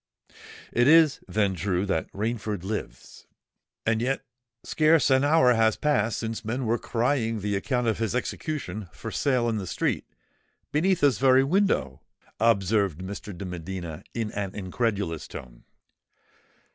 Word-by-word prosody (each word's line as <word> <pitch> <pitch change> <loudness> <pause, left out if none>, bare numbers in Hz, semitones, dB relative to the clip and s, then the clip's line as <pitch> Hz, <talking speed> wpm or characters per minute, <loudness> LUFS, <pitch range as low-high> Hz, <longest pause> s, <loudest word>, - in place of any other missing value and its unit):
"It 120 +1 +3
is, 160 -2 +6
then, 100 -3 +1
true 95 0 -1
that 95 -5 -2
Rainford 105 -2 -3
lives——" 95 - -6 0.6
"And 110 0 +1
yet 135 +3 -1 0.4
scarce 155 -2 +3
an 130 +1 +4
hour 145 -4 +5
has 110 -1 +3
passed 115 -7 +1
since 115 0 -4
men 120 +4 -2
were 115 +1 +1
crying 115 -2 0
the 100 0 -1
account 125 +5 -1
of 110 -2 0
his 115 0 -1
execution 125 - -4
for - - -7
sale 125 -4 +1
in 115 -2 0
the 95 -3 -4
street—beneath 180 - -3
this 145 -3 +3
very 130 0 +5
window," 135 - +1 0.4
observed 100 -5 +2
Mr. 100 0 -7
de 100 - -6
Medina, 85 -2 -6
in 115 -2 -2
an 100 -2 -4
incredulous 100 -4 -2
tone. - - -11
110 Hz, 140 wpm, -26 LUFS, 100-130 Hz, 0.6 s, is